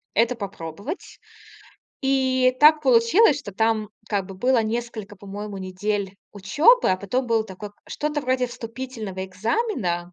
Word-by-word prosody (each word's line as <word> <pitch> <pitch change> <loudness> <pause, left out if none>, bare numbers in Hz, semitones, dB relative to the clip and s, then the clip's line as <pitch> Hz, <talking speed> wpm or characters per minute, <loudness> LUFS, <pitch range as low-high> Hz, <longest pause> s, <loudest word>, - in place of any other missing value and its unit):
это 235 +3 +3
попробовать. 200 - -7 0.8
И 260 -1 +2
так 305 0 +7
получилось, 270 - +5
что 205 -8 -8
там 220 0 +1 0.2
как 200 -3 -1
бы 195 - -9
было 245 +3 +2
несколько, 220 -2 -4
по-моему, 200 +1 -7
недель 195 +1 -3 0.2
учебы, 295 - +4
а 185 - +2
потом 245 +7 -2
было 225 -1 +2
такое 205 0 -9
к - - -34
что-то 300 0 -2
вроде 255 -1 0
вступительного 230 -5 -6
экзамена. 185 - -2
225 Hz, 135 wpm, -23 LUFS, 195-260 Hz, 0.8 s, так